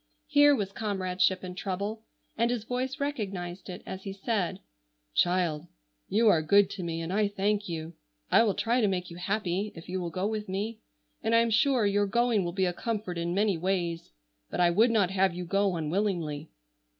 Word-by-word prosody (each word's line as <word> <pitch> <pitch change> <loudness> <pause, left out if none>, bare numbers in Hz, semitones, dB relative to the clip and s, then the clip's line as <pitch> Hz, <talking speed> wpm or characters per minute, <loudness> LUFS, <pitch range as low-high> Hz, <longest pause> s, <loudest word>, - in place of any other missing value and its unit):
Here 290 -1 +6
was 200 -5 -2
comradeship 190 -3 0
in 180 -1 -5
trouble, 200 +4 -4 0.3
and 235 +1 +2
his 240 -3 -1
voice 255 +4 -3
recognized 195 -11 -4
it 180 - -7
as 190 - -6
he 195 - -5
said: 195 -2 -1 0.5
"Child, 175 - +1 0.4
you 225 +3 +3
are 170 -7 +5
good 200 +5 +4
to 200 - -5
me, 165 -1 -3
and 165 +3 -4
I 210 +1 +3
thank 205 0 -1
you. 165 0 -5 0.4
I - - +7
will 215 -4 +2
try 240 +2 +1
to 215 - +3
make 180 -2 -2
you 170 - -9
happy 200 +1 -1
if 165 - -11
you 185 +1 -3
will 175 - -3
go 185 +3 -2
with 215 -1 -3
me, 210 +4 -3 0.4
and 225 +1 +2
I 230 - +6
am 230 0 +1
sure 255 0 +3
your 205 0 +2
going 235 -1 +2
will 175 - -2
be 190 +1 +1
a 180 - 0
comfort 205 -4 -3
in 170 +1 -1
many 200 -4 +2
ways, 175 -2 -1 0.4
but - - -4
I 175 -1 +5
would 220 +7 +4
not 205 -5 +2
have 190 -2 +2
you 180 0 -4
go 195 +1 +1
unwillingly." 160 -2 -1
195 Hz, 200 wpm, -29 LUFS, 180-215 Hz, 0.5 s, I